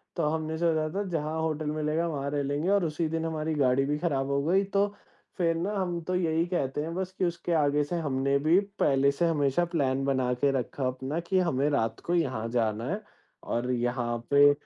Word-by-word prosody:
तो 170 - -1
हमने 160 0 -2
सोचा 160 -2 +1
था 200 - 0
जहाँ 160 -1 -2
होटल 155 -1 -1
मिलेगा, 155 +2 0
वहाँ 140 -3 -3
रह 145 -1 0
लेंगे 145 +5 -1
और 200 -3 +3
उसी 160 +1 -1
दिन 165 0 -2
हमारी 160 -1 -2
गाड़ी 135 -1 +3
भी 145 +1 0
खराब 140 -5 0
हो 140 0 +1
गई 185 +6 +3
तो 200 +1 +1 0.5
फिर 165 -3 +2
ना 180 +6 -2
हम 180 -3 -1
तो 180 +3 -2
यहीं 165 -2 +1
कहते 150 -6 -1
हैं 165 +2 -4
बस 185 0 -3
कि 185 - +1
उसके 170 0 -3
आगे 145 -1 +3
से 145 +5 -4
हमने 140 -2 +1
भी 160 +6 +4 0.2
पहले 140 0 +4
से 155 +5 0
हमेशा 150 +1 +2
प्लान 135 -4 +1
बना 130 -2 +1
के 140 -1 +4
रखा 130 0 -2
अपना 130 +5 -3
कि 185 +2 0
हमें 150 -5 +1
रात 115 -6 0
को 175 - +1
यहाँ 130 -9 0
जाना 115 -1 0
है 200 +5 -2 0.5
और 125 +2 0
यहाँ 120 -1 -1
पे 145 0 +7
150 Hz, 215 wpm, -28 LUFS, 135-170 Hz, 0.5 s, पे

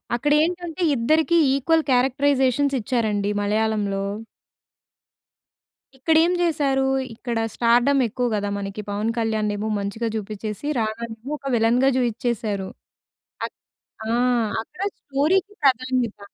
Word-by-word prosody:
అక్కడ 290 +5 0
ఏంటంటే, 350 0 -3
ఇద్దరికీ 315 +8 +2 0.2
ఈక్వల్ 320 +4 +2
క్యారెక్టరైజేషన్స్ 270 +1 +2
ఇచ్చారండి 210 -3 0
మలయాళంలో... 205 -1 0 1.9
ఇక్కడ 315 +5 +1
ఏం 355 - +2
జేసారు. 285 -6 +1 0.3
ఇక్కడ 235 0 -3 0.2
స్టార్‌డమ్ 245 +4 +3
ఎక్కువ 245 +3 -2
కదా, 205 0 -2
మనకి 200 +1 -5
పవన్ 210 +3 -1
కళ్యాణ్ 220 -2 0
ఏమో 215 +2 -3
మంచిగా 200 +4 -3
జూపించేసి, 215 +4 -5
రాణానేమో 225 +3 -4
ఒక 275 -2 -4
విలె‌న్‌గా 235 +4 +3
జూఇచేసారు. 220 -5 -1 0.8
అక్ - - -15 0.5
ఆ! - - +1 0.5
అక్కడ 300 +10 -12 0.2
స్టోరీ‌కి 355 +9 0
ప్రాధాన్యత. 255 -4 +1
240 Hz, 105 wpm, -23 LUFS, 215-280 Hz, 1.9 s, స్టార్‌డమ్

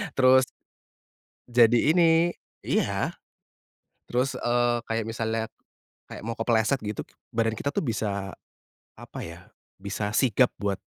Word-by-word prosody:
terus 130 0 +6 1.0
Jadi 120 +2 +5
ini 165 -1 +4 0.3
iya - - 0 0.9
terus, 125 +2 0
eee, 120 0 +2
kayak 115 -1 -1
misalnya, 115 0 -2 0.6
kayak - - -9
mau 115 - -2
kepleset 115 +3 +2
gitu 105 -1 -4 0.3
badan 115 -1 +2
kita 140 - -1
tuh - - +1
bisa 100 -6 -2 0.6
apa - - -9
ya, 85 +2 -11 0.3
bisa 105 +1 -3
sigap 125 -1 +3
buat 100 -1 -1
115 Hz, 115 wpm, -26 LUFS, 110-130 Hz, 1.0 s, terus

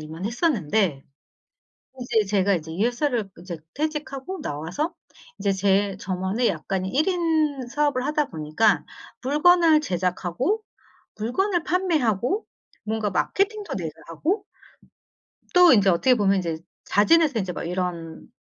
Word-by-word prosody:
일만 160 +4 -8
했었는데 215 - 0 1.0
이제 225 -3 +1
제가 195 0 +2
이제 160 -1 -6
이 195 +7 0
회사를 245 -4 -1
이제 175 -2 -6 0.2
퇴직하고 300 +2 -4
나와서 165 - -3 0.5
이제 200 - +1
제 195 0 +1
저만의 190 +5 -1
약간의 190 -1 -3
1 305 +6 +1
인 315 -7 +1
사업을 275 -1 0
하다 300 -1 0
보니까 160 +7 +1 0.4
물건을 315 +2 +5
제작하고 185 - -1 0.5
물건을 340 - 0
판매하고 335 - 0 0.4
뭔가 220 -1 -1
마케팅도 405 - -1
내가 165 -5 -4 0.2
하고 350 - -2 1.1
또 360 -4 +8
인제 200 -4 +5
어떻게 250 +9 +4
보면 200 -3 +2
인제 165 -4 -2 0.3
자진해서 290 +5 +4
인제 185 -2 -3
막 - - -5
이런 170 -2 -4
220 Hz, 280 characters per minute, -24 LUFS, 185-305 Hz, 1.1 s, 또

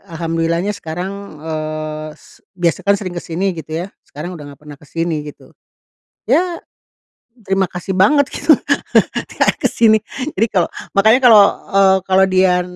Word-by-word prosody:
alhamdulillahnya 165 +3 -1
sekarang, 180 -1 -5 0.3
eee, 155 -1 -4
s - - -21 0.2
biasa 175 +2 -1
kan 200 - +5
sering 190 -3 -6
ke 175 - -5
sini 180 +4 -2
gitu 160 0 -5
ya 195 - -10 0.2
sekarang 160 +5 -7
udah 145 -4 -10
nggak - - -35
pernah 145 -2 -12
ke 150 - -18
sini 165 -1 -3
gitu, 145 - -13 0.8
ya, 350 -1 +1 0.9
terima 195 -1 0
kasih 180 +2 -5
banget 280 +11 +4
gitu 290 -1 +4 0.8
gak - - +1
ke - - +6
sini 220 -1 +4 0.4
jadi 225 - +3
kalo 175 -3 +3 0.3
makanya 220 +5 +5
kalo, 220 -3 +8 0.3
eee, 190 -1 +5
kalo 190 0 +3
dia 185 -1 +3
180 Hz, 155 wpm, -17 LUFS, 160-195 Hz, 0.9 s, kalo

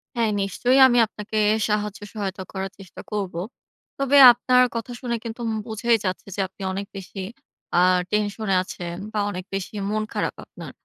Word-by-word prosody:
হ্যাঁ, 230 -2 +1
নিশ্চয়ই 245 +7 +2
আমি 245 -1 +2
আপনাকে 215 0 -6 0.3
সাহায্য 210 -1 -1
সহায়তা 195 -3 -4
করার 195 0 -4
চেষ্টা 190 -4 -11
করব। 200 -3 -2 0.7
তবে 275 +1 +3
আপনার 250 +1 +3
কথা 230 +1 -4
শুনে 240 -2 -2
কিন্তু 230 0 -7
উম 220 - -1
বোঝাই 230 +1 +2
যাচ্ছে, 185 +1 -3
যে - - -7
আপনি 195 +2 -18
অনেক 200 +1 -4
বেশি 195 +1 -8 0.6
আ - - +6 0.3
টেনশন 210 +1 -1
এ - - +4
আছেন 175 -2 -6 0.2
বা 215 - -2
অনেক 185 -2 -6
বেশি 195 +1 -4 0.2
মন 215 0 0
খারাপ - - -2
আপনার। - - -10
210 Hz, 170 wpm, -23 LUFS, 195-230 Hz, 0.7 s, আ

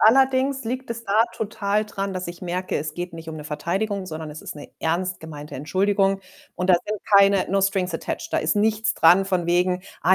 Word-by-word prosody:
Allerdings 265 +2 +4
liegt 255 +1 -4
es 230 0 -5
da 215 +2 +4
total 210 0 -1
dran, 200 -2 -4
dass 185 -1 -4
ich 175 - -8
merke, 180 +1 -2
es 150 +1 -3
geht 175 0 -5
nicht 165 0 -9
um 160 - -5
'ne 150 - -7
Verteidigung, 185 +6 -2
sondern 155 -2 -6
es 155 - -9
ist - - -6
'ne 150 - -10
ernst 175 +3 -1
gemeinte 150 -2 -8
Entschuldigung. 195 +6 +1 0.3
Und 180 +1 0
da - - +8
sind 210 -1 -3 0.2
keine 200 -1 +5
no 195 +1 +2
strings 190 -2 +1
attached, - - -4
da - - +2
ist 155 - +1
nichts 220 +1 +2
dran 175 +4 +6
von 180 -3 0
wegen: 180 +1 +2 0.2
„Ah, 185 +2 +6
185 Hz, 215 wpm, -23 LUFS, 170-205 Hz, 0.3 s, da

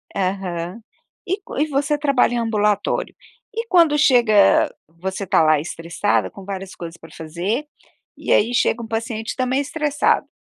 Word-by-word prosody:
Aham. 185 0 -3 0.4
E 370 - 0
c 405 - -24 0.2
e - - -2
você 290 +1 0
trabalha 280 -4 +2
em - - 0
ambulatório. 210 -3 0 0.4
E 455 +1 -3
quando 335 -7 +4
chega 240 -8 +4
você 185 +5 -5
está 175 - +3
lá 155 -1 +4
estressada, 170 +5 -1
com 195 -3 -12
várias 195 -1 -6
coisas 170 -1 -8
pra 165 - -14
fazer, 175 - -3 0.5
e - - -4
aí 230 +4 +3
chega 235 0 +2
um 230 - -7
paciente 225 0 -3
também 255 +1 0
estressado. 295 0 0
220 Hz, 155 wpm, -21 LUFS, 185-275 Hz, 0.5 s, quando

